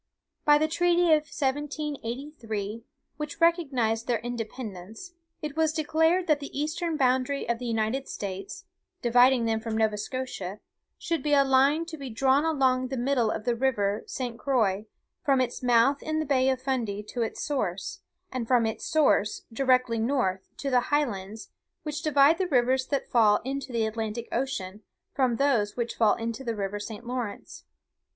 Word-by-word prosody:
"By 295 0 +7
the 310 +1 +2
treaty 345 +1 +3
of 305 0 +1
1783, 270 -6 -3 0.3
which 300 -1 -5
recognised 270 -10 +2
their 240 -2 +2
independence, 225 - -7 0.3
it 300 -1 -4
was 320 -1 +2
declared 320 +3 +2
that 305 -4 +2
the 280 -1 -6
eastern 315 +2 -1
boundary 260 0 +1
of 235 0 0
the 250 - -5
United 230 +4 -1
States, 200 - -6 0.4
dividing 245 +1 +5
them 225 -1 +1
from 220 -1 -3
Nova 215 -2 +1
Scotia, 210 -5 -5 0.4
should 335 -2 -2
be 295 -1 0
'a 280 - +6
line 275 +4 +3
to 325 -1 -8
be 275 -3 -6
drawn 265 +5 +2
along 260 -5 +2
the 265 +1 -4
middle 245 -2 +1
of 215 - -3
the 240 - +2
river 225 -5 0
St. 245 -3 -4
Croix, 220 -6 +1 0.4
from 275 -4 +3
its 250 -2 -1
mouth 245 +3 +3
in 310 0 -2
the 310 - -1
bay 265 -2 +2
of 260 -1 0
Fundy 240 -6 -2
to 235 +3 -5
its 225 - -2
source, 275 - -2 0.3
and 255 -3 -3
from 245 -2 +3
its 220 - -3
source, 285 -9 +2
directly 255 -2 +2
north, 220 -6 0
to 275 - -3
the 250 - +5
highlands, 220 -8 -2 0.3
which 300 0 -4
divide 300 +1 +4
the 375 - +1
rivers 260 -2 +2
that 280 -2 -1
fall 220 -4 +4
into 270 0 -4
the 230 -2 +1
Atlantic 220 +1 -3
Ocean 215 -6 -3 0.3
from 255 -3 +2
those 235 -6 +1
which 235 -1 -2
fall 220 -3 +3
into 230 +2 -4
the 230 -3 -2
river 205 0 -3
St. 220 +2 -7
Lawrence. 240 -4 -5
255 Hz, 170 wpm, -27 LUFS, 225-285 Hz, 0.4 s, By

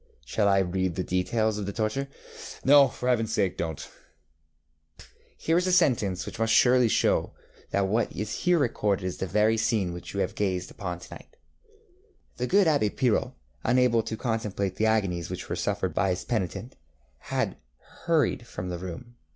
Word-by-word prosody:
ŌĆØŌĆÖ 60 - -33
Shall 100 - +1
I 100 -1 +4
read 95 -1 0
the 90 - -1
details 105 +4 0
of 100 - -4
the - - -2
torture? 110 +6 -1 0.3
ŌĆØ - - -11
ŌĆ£No, 140 -1 +7
for 125 - -5
HeavenŌĆÖs 115 -3 +2
sake, 105 -4 0
donŌĆÖt. 80 -3 -4 1.1
ŌĆØ - - -14 0.3
ŌĆ£Here 165 +1 +1
is 180 - -1
a - - +2
sentence 105 - +2
which - - -8
must 115 0 +1
surely 125 +1 +5
show - - +2
you - - -11 0.4
that 100 -1 +1
what 110 +4 0
is 105 +1 -4
here 180 -1 +2
recorded 105 - 0
is 90 - -3
the 95 - -3
very 105 +4 +2
scene 105 -6 0
which 90 +3 -8
you 100 - 0
have - - -1
gazed 95 -3 -2
upon 90 -5 -5
to 90 - -12
night: 475 - -14 1.0
ŌĆśThe 125 - -1
good 200 0 +5
Abb├® 145 -10 +2
Pirot, 120 -5 +1 0.3
unable 120 -1 +3
to 110 0 -5
contemplate 105 -5 -2
the 110 - +2
agonies 95 -6 0
which - - -6
were - - -3
suffered - - -1
by 95 - +1
his 90 0 -2
penitent, 115 +1 -3 0.4
had - - -2 0.5
hurried 150 -7 +1
from 90 -3 -6
the 90 -1 -4
room. 95 +7 -8
110 Hz, 190 wpm, -27 LUFS, 95-120 Hz, 1.1 s, ŌĆ£No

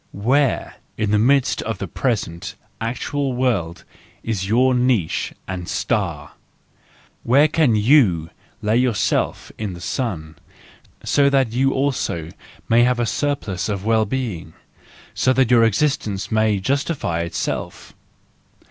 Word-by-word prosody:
Where, 130 +6 0 0.2
in 105 -2 0
the 105 - +3
midst 130 +3 +2
of 110 -1 -3
the 95 - -5
present, 100 -5 -3 0.3
actual 130 +4 -2
world, 110 -10 -1 0.4
is 100 -4 -2
your 125 +5 +3
niche 125 -9 +1 0.2
and 90 -3 -5
star? - - -2 0.9
Where 140 +6 +4
can 150 -6 +2
you 105 - +3 0.3
lay 110 +2 +2
yourself 120 -5 0
in 105 -4 -3
the 85 - -9
sun, 85 - -4 0.7
so 140 -1 +3
that 135 -4 +2
you 135 +3 +2
also 125 - -1 0.4
may 115 +1 +4
have 125 0 +2
a 120 - +1
surplus 110 -9 -2
of 100 -1 -3
well 110 -1 +3
being, 100 -10 -4 0.7
that 130 -1 +3
your 120 -2 +6
existence 115 -3 0
may 110 -1 +2
justify 135 - -1
itself? 85 0 -4
115 Hz, 125 wpm, -21 LUFS, 95-130 Hz, 0.9 s, your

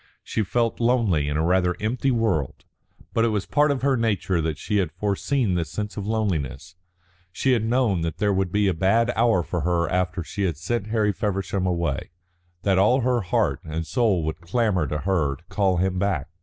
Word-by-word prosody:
She 110 - -2
felt 115 +3 0
lonely 115 - +2
in 75 - -1
a 80 - +1
rather 90 0 +2
empty 120 +5 0
world. 110 - -1 0.5
But 115 - +2
it - - +3
was 105 -3 -1
part 150 0 +2
of 140 -2 -1
her 140 -1 +3
nature 100 -7 0
that 80 -2 -2
she 105 +6 -1
had 90 -6 0
foreseen 105 - 0
this 85 -4 -1
sense 105 +5 -4
of 100 -1 -5
loneliness; 85 - -2 0.6
she 130 +8 0
had 120 -4 +2
known 115 -6 +1
that 80 -1 -3
there 105 -1 +1
would 95 -2 0
be 105 0 +2
a 95 - +2
bad 110 +8 +2
hour 115 -6 +3
for 85 +1 -3
her 85 +1 +1
after 90 -1 -1
she 100 - -6
had 85 -6 -1
sent 105 +6 -2
Harry 110 -2 +1
Feversham 95 0 -2
away, 85 -5 -1 0.5
that 95 -2 +3
all 125 +7 +4
her 125 0 +1
heart 95 - 0
and 80 +1 -4
soul 105 -6 +1
would 80 +1 -4
clamour 95 -2 0
to 75 - -2
her 80 -7 0
to 85 - -20
call 95 -3 +1
him 95 +1 0
back. 95 -9 -1
95 Hz, 205 wpm, -24 LUFS, 85-115 Hz, 0.6 s, all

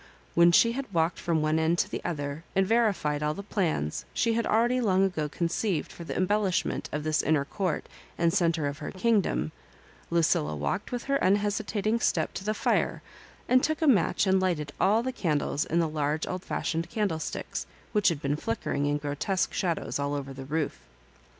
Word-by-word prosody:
When 170 0 +6
she 230 +7 +5
had 260 -1 -5
walked 165 -1 +1
from 165 -3 0
one 155 +1 +2
end 160 +2 +2
to - - +1
the - - -5
other, 145 -2 -3
and 195 0 +4
verified 200 -10 +1
all 150 0 0
the 200 - -6
plans 170 - -1
she 230 -1 +2
had 230 0 0
already 240 +3 +2
long 195 -4 +3
ago 155 -6 -2
conceived 170 +1 -1
for 170 - -9
the 165 - -5
embellishment 190 0 0
of 150 0 -3
this 155 0 +1
inner 150 -2 +2
court 185 +2 -2 0.3
and 170 -1 +2
centre 170 -5 +2
of 140 +1 -3
her - - -5
kingdom, 200 -5 +1 0.6
Lucilla 155 - +2
walked 70 -1 -2
with 245 -1 -3
her 275 0 +1
unhesitat 205 +1 +1
ing 225 +2 +2
step - - 0
to - - -5
the 215 +2 -1
fire, - - 0 0.4
and 255 0 +4
took 315 0 0
a 320 - +1
match 225 -5 +3
and 190 0 +3
lighted 165 -6 -1
all 215 +4 +3
the 260 - -1
candles 150 -5 0
in 165 - -1
the 170 -1 +3
large 150 0 -1
old 185 0 -4
fashioned 165 +1 -2
candle 200 -7 -1
sticks, - - -4 0.2
which 210 -2 +2
had 165 -5 +2
been 140 +1 +1
flickering 145 +1 -2
in 145 0 +1
grotesque 150 +5 -1
shadows 170 -5 -1
all 140 0 -1
over 135 -1 -5
the 135 0 -8
roof. 150 - -2
170 Hz, 195 wpm, -28 LUFS, 150-205 Hz, 0.6 s, When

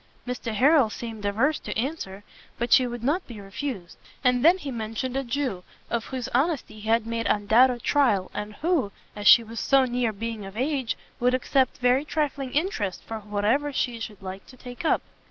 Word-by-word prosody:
Mr 250 -2 -3
Harrel 275 +1 +5
seemed 220 -1 -7
averse 235 +10 +1
to - - -5
answer, 220 -7 -3 0.3
but 240 0 +1
she 255 - +6
would 240 -1 -6
not 310 +9 0
be 230 -4 -9
refused; 195 -1 -6 0.2
and 250 -1 +3
then 340 +4 +7
he 290 -7 -6
mentioned 230 +2 -4
a 270 - 0
Jew, 245 -7 -2 0.3
of 235 -2 -1
whose 255 -3 -4
honesty 275 -4 0
he 215 +1 -6
had 225 0 +3
made 230 0 -2
undoubted 235 +4 +4
trial, 240 -10 +2
and 210 0 -5
who, 310 - 0 0.2
as 205 -1 -2
she 235 - +9
was 225 0 -7
so 270 -1 +4
near 245 -2 0
being 220 0 -5
of 195 +2 -9
age, 265 -1 -1 0.2
would 250 +1 +3
accept 260 +1 +1
very 250 +2 +3
trifling 290 -3 -2
interest 265 - -1
for 225 -1 -6
whatever 210 +8 0
she 245 -3 -1
should 210 -3 -7
like 190 +1 -7
to 255 - -15
take 245 -1 -9
up. 325 - +2
240 Hz, 190 wpm, -26 LUFS, 215-270 Hz, 0.3 s, she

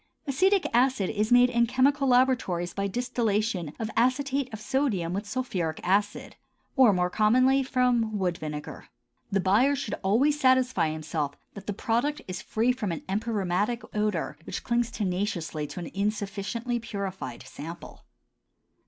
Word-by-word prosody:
Acetic 375 +7 +2
acid 245 -5 +2
is 215 +2 -1
made 245 0 +6
in 235 0 +3
chemical 275 +3 +2
laboratories 245 -9 +2
by 200 0 -1
distillation 215 -6 -1
of 225 -1 -4
acetate 260 +2 +1
of 220 - -6
sodium 215 -9 0
with 205 +2 -3
sulphuric 185 -11 -2
acid, 205 +3 0 0.4
or 260 -6 +6
more 180 -2 0
commonly 255 +6 +4
from 250 -4 +1
wood 180 -3 0
vinegar. 150 -1 -7 0.4
The 195 - +2
buyer 220 +10 +3
should 240 - -4
always 265 +10 +2
satisfy 255 - +3
himself 155 -2 -3 0.2
that 200 -1 -10
the 205 - -1
product 240 +9 0
is 185 0 -5
free 230 +3 +1
from 235 -7 -3
an 165 - -4
empyreumatic 205 +1 -1
odor 210 -7 -1
which - - -5
clings 235 -1 +1
tenaciously 180 -7 -2
to - - -7
an 170 - -7
insufficiently 210 +4 -2
purified 195 - -5
sample. 165 +6 -9
215 Hz, 145 wpm, -27 LUFS, 185-250 Hz, 0.4 s, made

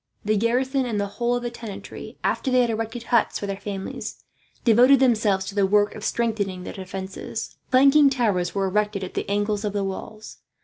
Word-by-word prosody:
The 215 +1 +2
garrison 255 +4 +1
and 215 -3 -1
the 205 - 0
whole 235 +4 -1
of 245 - -3
the 240 - -3
tenantry, 230 -4 -9
after 270 - 0
they 255 -1 +4
had 240 -2 +1
erected 225 +1 -4
huts 235 -1 +2
for - - -4
their 195 -1 -3
families, 195 -1 -6 0.4
devoted 245 +4 +6
themselves 215 -7 +2
to 195 - -6
the 200 -1 +2
work 205 +1 +3
of 210 - -9
strengthening 210 -6 -1
the - - -7
defences. 190 0 -6
Flanking 275 +2 +6
towers 210 -10 0
were 195 -1 +1
erected 205 +1 0
at 185 - -6
the - - -3
angles 205 +1 0
of 205 -1 -2
the 205 -1 -1
walls. 215 +3 -7
215 Hz, 195 wpm, -24 LUFS, 200-240 Hz, 0.4 s, devoted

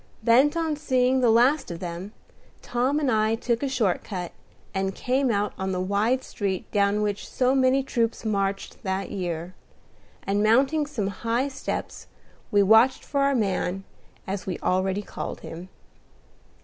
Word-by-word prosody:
Bent 260 +8 +4
on 320 -2 0
seeing 260 -3 +2
the 245 -2 +3
last 245 +7 +4
of 170 - -5
them, 175 +3 -6 0.5
Tom 255 +5 0
and 280 -4 +1
I 220 0 +2
took 235 0 -1
a 280 - -1
short 230 -9 0
cut, 180 -4 -5 0.4
and 195 0 -1
came 260 +1 0
out 205 -2 0
on 190 0 -2
the 180 - -1
wide 205 +7 +1
street 195 -3 -4
down 205 0 +2
which 205 -1 -3
so 255 0 +2
many 265 0 +3
troops 230 -3 -1
marched 200 -2 -2
that 190 0 -3
year; 175 -2 -4 0.7
and, 200 +1 0
mounting 270 +8 +3
some 215 -10 -2
high 235 +4 0
steps, 275 0 -5 0.4
we 205 -1 +4
watched 220 +6 +5
for 280 -1 -1
our 275 0 +3
man, 195 -3 -1 0.4
as 190 -1 -4
we 185 - -2
already 190 +2 0
called - - -6
him. 175 +3 -9
220 Hz, 160 wpm, -25 LUFS, 195-260 Hz, 0.7 s, watched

